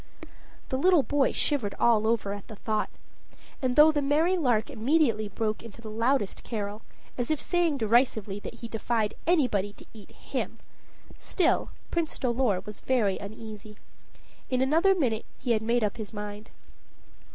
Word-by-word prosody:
The 260 Hz, -, -1 dB
little 355 Hz, -2 st, +5 dB
boy 285 Hz, -1 st, +2 dB
shivered 245 Hz, -9 st, 0 dB
all 220 Hz, -2 st, +4 dB
over 220 Hz, -3 st, 0 dB
at 205 Hz, -1 st, -8 dB
the 215 Hz, -, -9 dB
thought. 215 Hz, +1 st, -1 dB, 0.7 s
And, 255 Hz, -2 st, 0 dB
though 300 Hz, +1 st, +8 dB
the 295 Hz, -1 st, 0 dB
merry 305 Hz, +6 st, +2 dB
lark 245 Hz, -10 st, +1 dB
immediately 230 Hz, -3 st, +2 dB
broke 215 Hz, +2 st, -2 dB
into 230 Hz, -1 st, -12 dB
the 220 Hz, -2 st, -8 dB
loudest 230 Hz, -1 st, 0 dB
carol, 210 Hz, -1 st, -4 dB, 0.4 s
as 240 Hz, -, -1 dB
if 310 Hz, -2 st, +1 dB
saying 345 Hz, -5 st, +2 dB
derisively 220 Hz, -3 st, +2 dB
that 215 Hz, -, -8 dB
he 230 Hz, -, -5 dB
defied 225 Hz, -1 st, -1 dB
anybody 245 Hz, -, +2 dB
to -, -, -15 dB
eat 215 Hz, -3 st, -13 dB
him, -, -, -5 dB, 0.6 s
still, 350 Hz, -3 st, +1 dB, 0.2 s
Prince 335 Hz, -2 st, -1 dB
Dolor 235 Hz, -6 st, +1 dB
was 210 Hz, +1 st, -9 dB
very 225 Hz, -7 st, +1 dB
uneasy. 215 Hz, 0 st, -9 dB, 0.7 s
In 255 Hz, -, +1 dB
another 330 Hz, +8 st, +4 dB
minute 240 Hz, -10 st, -1 dB
he 245 Hz, -, -2 dB
had 220 Hz, -2 st, +2 dB
made 235 Hz, +1 st, +1 dB
up 210 Hz, +1 st, -1 dB
his 215 Hz, -3 st, -6 dB
mind. 210 Hz, 0 st, -7 dB
230 Hz, 160 wpm, -28 LUFS, 210-275 Hz, 0.7 s, though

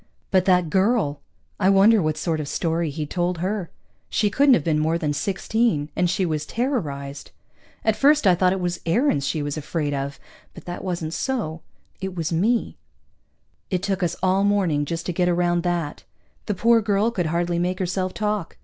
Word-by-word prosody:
But 185 Hz, -1 st, +3 dB
that 180 Hz, -4 st, +3 dB
girl! 190 Hz, -, +1 dB, 0.4 s
I 190 Hz, -1 st, +3 dB
wonder 200 Hz, +2 st, +6 dB
what 155 Hz, -1 st, -1 dB
sort 160 Hz, 0 st, -1 dB
of 150 Hz, -, -4 dB
story 165 Hz, +2 st, -1 dB
he'd 150 Hz, +1 st, -5 dB
told 175 Hz, 0 st, 0 dB
her? 185 Hz, +1 st, -2 dB, 0.4 s
She 210 Hz, -2 st, +1 dB
couldn't 275 Hz, +3 st, +5 dB
have 160 Hz, -, -1 dB
been 155 Hz, -1 st, +1 dB
more 160 Hz, +2 st, +1 dB
than 150 Hz, -3 st, -1 dB
sixteen, 195 Hz, -2 st, 0 dB
and 180 Hz, -, +1 dB
she 185 Hz, +1 st, 0 dB
was 155 Hz, -3 st, -1 dB
terrorized. 150 Hz, -, -3 dB, 0.6 s
At 220 Hz, -1 st, +3 dB
first 290 Hz, +1 st, +4 dB
I 185 Hz, -, +6 dB
thought 180 Hz, +1 st, +3 dB
it 190 Hz, -, -1 dB
was 175 Hz, -1 st, -2 dB
Aarons 165 Hz, -, +2 dB
she 155 Hz, -3 st, -1 dB
was 145 Hz, +1 st, -3 dB
afraid 150 Hz, -1 st, -2 dB
of, 140 Hz, 0 st, -4 dB, 0.4 s
but -, -, -12 dB
that 175 Hz, -, -6 dB
wasn't 170 Hz, -4 st, -3 dB
so. 190 Hz, -13 st, -2 dB, 0.4 s
It 190 Hz, -1 st, -5 dB
was 165 Hz, 0 st, -2 dB
me. 220 Hz, +8 st, +1 dB, 0.9 s
It 185 Hz, -2 st, -1 dB
took 195 Hz, -1 st, -1 dB
us 175 Hz, -3 st, 0 dB
all 190 Hz, +1 st, +3 dB
morning 185 Hz, -8 st, +2 dB
just 165 Hz, +2 st, -4 dB
to 180 Hz, -, -2 dB
get 180 Hz, +1 st, +1 dB
around 175 Hz, 0 st, +1 dB
that. 170 Hz, -4 st, -2 dB, 0.4 s
The 210 Hz, -, -1 dB
poor 230 Hz, +4 st, +4 dB
girl 210 Hz, +2 st, +1 dB
could 180 Hz, -7 st, -1 dB
hardly 170 Hz, +1 st, 0 dB
make 180 Hz, +1 st, -1 dB
herself 185 Hz, 0 st, -1 dB
talk. 210 Hz, -4 st, -3 dB
180 Hz, 190 wpm, -23 LUFS, 160-200 Hz, 0.9 s, wonder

